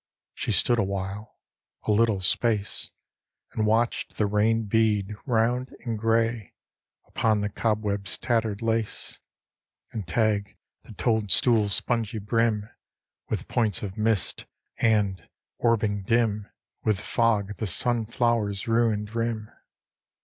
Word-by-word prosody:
She - - -3
stood 120 -1 +3
a - - +3
while, 100 +2 -5 0.5
a - - 0
little 105 -2 +3
space, 105 +2 +1 0.6
And 110 -1 0
watched 115 +2 0
the 105 - +2
rain 110 +2 +2
bead, 105 -1 +1
round 120 +2 +1
and 115 -3 -2
gray, 115 0 0 0.5
Upon 110 -2 +1
the 105 - -1
cobweb's 105 -3 -1
tattered 115 -3 -1
lace, 115 -1 -2 0.7
And 105 -6 -5
tag 105 +3 0 0.2
the - - -13
toadstool's 110 -1 +3
spongy 115 -2 -1
brim 110 0 0 0.6
With - - -3
points 110 -4 0
of 100 -2 -5
mist; 110 -3 0 0.3
and, 105 -4 +1 0.3
orbing, 110 -4 +1
dim 105 0 0 0.3
With 105 -3 +1
fog 105 -3 0
the 110 - -2
sunflower's 115 -1 +1
ruined 110 -2 +1
rim. 115 -2 -2
110 Hz, 115 wpm, -26 LUFS, 105-115 Hz, 0.7 s, stood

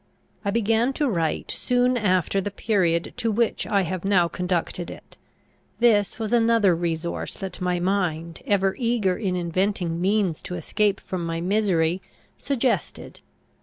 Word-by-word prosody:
I 200 - -1
began 225 +4 +2
to 295 +1 0
write 165 -9 -1
soon 250 0 +1
after 195 -3 +1
the 205 - -3
period 185 -5 0
to 235 -2 0
which 230 +1 0
I 200 -2 +2
have 180 0 -4
now 190 -3 +3
conducted 180 0 -2
it. - - -12 0.6
This 215 -5 +3
was 220 0 -3
another 230 -5 +4
resource 170 0 -3
that 190 -2 -6
my 180 -1 0
mind, 175 -3 -1
ever 195 -1 +2
eager 230 -6 +1
in 190 -4 -2
inventing 175 -1 -1
means 195 -3 +1
to 180 - -3
escape 200 +4 0
from 185 -2 -5
my 165 0 -2
misery, 180 -2 +1 0.3
suggested. 265 -2 -2
195 Hz, 145 wpm, -24 LUFS, 175-220 Hz, 0.6 s, another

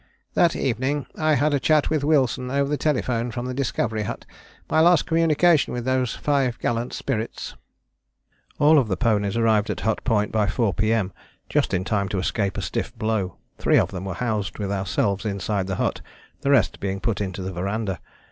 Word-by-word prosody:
"That 170 -1 +3
evening 135 +3 -1
I 155 -1 +2
had 145 +3 +2
a 140 - +2
chat 155 +2 +2
with 155 -3 +1
Wilson 130 -4 +2
over 140 +1 +1
the 150 - 0
telephone 125 -5 0
from 120 +1 -4
the 130 - -3
Discovery 120 -4 -1
Hut 105 - -5 0.4
my 155 - +2
last 170 0 +5
communication 165 -1 +3
with 120 -1 -4
those 130 -2 0
five 135 -5 0
gallant 120 +1 -2
spirits." 115 -4 -3 1.0
All 150 -1 +5
the 100 -5 -2
ponies 105 -3 +1
arrived 110 -2 +2
at 105 - -3
Hut 110 - -1
Point 105 -3 +1
by 105 -2 +1
4 110 +1 +1
P.M., 110 -3 0 0.4
just - - +1
in 95 -1 0
time 100 -1 -1
to 100 - -2
escape 100 +1 -1
a - - -3
stiff - - -3
blow. 110 -4 -1 0.2
Three - - +3
of - - +2
them 95 -1 -5
were 95 -2 -4
housed 110 -4 -2
with 100 -2 -3
ourselves 100 0 0
inside 100 -2 -2
the 95 - -2
hut, - - -1 0.4
the 140 - -2
rest 130 -8 +3
being 95 0 -2
put 105 0 -1
into 95 -1 -4
the 95 0 -4
verandah. 95 +2 -2
115 Hz, 190 wpm, -23 LUFS, 100-140 Hz, 1.0 s, last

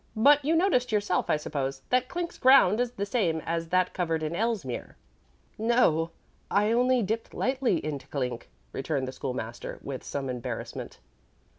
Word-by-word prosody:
But 285 +6 +5
you 315 +4 +2
noticed 290 -9 +2
yourself, 205 -4 0
I - - +3
suppose, 135 -2 -3
that 255 0 +3
Clink's 350 -1 -4
ground 255 -6 +6
is 245 0 +1
the 200 -5 -3
same 195 -7 0
as 165 0 -2
that 185 0 +2
covered 165 -3 -1
in 155 +2 -2
Elsmere?" 205 - -2 0.6
"No; 215 -9 +3 0.4
I 210 +2 +2
only 250 +1 +3
dipped 220 +3 -3
lightly 260 -7 +1
into 140 -3 -4
Clink," 125 -4 -3 0.2
returned 135 -1 -2
the - - -4
School 130 -1 -4
master, 115 0 -6
with 135 -2 -5
some 140 -1 -4
embarrassment. 125 -2 -5
185 Hz, 160 wpm, -28 LUFS, -, 0.6 s, ground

